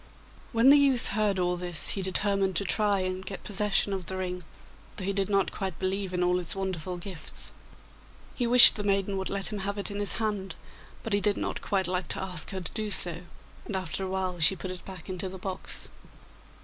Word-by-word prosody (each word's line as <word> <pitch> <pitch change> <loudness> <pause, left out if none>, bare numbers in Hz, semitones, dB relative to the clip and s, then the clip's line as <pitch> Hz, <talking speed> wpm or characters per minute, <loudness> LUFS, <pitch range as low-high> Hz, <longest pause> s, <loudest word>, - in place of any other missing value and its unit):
When 230 +4 +5
the 290 - +7
youth 270 -4 +3
heard 205 -1 0
all 180 -1 0
this 175 -2 +1
he 195 - 0
determined 195 0 +1
to 185 - +2
try 205 0 +2
and 185 0 -3
get 190 0 -8
possession 205 0 0
of 190 -3 -5
the 190 - -4
ring, 180 -1 -4 0.6
though 190 - -4
he 200 - -1
did 195 0 -1
not 195 -1 +1
quite 190 -4 -5
believe 190 0 -2
in 180 -1 -1
all 180 0 +2
its 180 +3 -3
wonderful 185 -2 -4
gifts. 175 -2 -8 0.8
He 245 - -2
wished 245 -1 +10
the 205 - -3
maiden 195 -1 0
would 190 - -2
let 200 +2 -1
him 205 - -4
have 200 +1 -3
it 200 +1 -3
in 200 - -5
his 205 - +2
hand, 210 -4 -3 0.5
but 225 - -4
he 200 - +2
did 205 +1 +1
not - - -4
quite 190 -2 -1
like 180 0 -2
to - - -3
ask 180 -5 -1
her 190 -1 -5
to 175 - -6
do 215 -1 -4
so, 175 -3 +4 0.4
and 205 - -5
after 185 0 -3
a - - -3
while 185 -2 -2
she 160 +4 +5
put 185 0 -6
it 180 -2 -8
back 185 -4 -9
into 185 0 -4
the 190 - -9
box. 190 0 -4
190 Hz, 225 wpm, -27 LUFS, 185-205 Hz, 0.8 s, wished